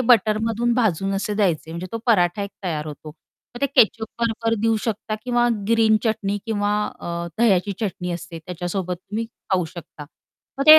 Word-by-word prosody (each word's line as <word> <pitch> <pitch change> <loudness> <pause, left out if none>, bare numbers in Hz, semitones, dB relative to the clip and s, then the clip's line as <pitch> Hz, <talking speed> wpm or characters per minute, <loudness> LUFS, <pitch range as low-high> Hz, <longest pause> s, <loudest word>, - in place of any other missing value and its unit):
बटरमधून 225 0 +3
भाजून 195 -5 +1
असे 205 +2 -1
द्यायचे 180 -7 +1
म्हणजे 170 +2 -5
तो 230 - -2
पराठा 190 -4 +3
एक 200 - -4
तयार 155 -3 -2
होतो. 150 0 -8 0.5
मग 240 - -8
ते 280 - +3
केचप 230 -4 +4 0.2
बरोबर 230 0 +1
देऊ 225 0 +3
शकता 215 -1 -2
किंवा 240 -1 +3 0.2
ग्रीन 225 -1 +5
चटणी 205 -2 0
किंवा 205 -2 +1 0.3
अ, 170 0 -3
दह्याची 200 -4 +3
चटणी 180 -4 -2
असते, 170 -1 -6
त्याच्यासोबत 180 +1 -3
तुम्ही 210 +5 -4 0.3
खाऊ 185 -2 +3
शकता. 155 -3 -9 0.5
मग 275 - +1
ते 310 0 +12
205 Hz, 165 wpm, -23 LUFS, 175-225 Hz, 0.5 s, ते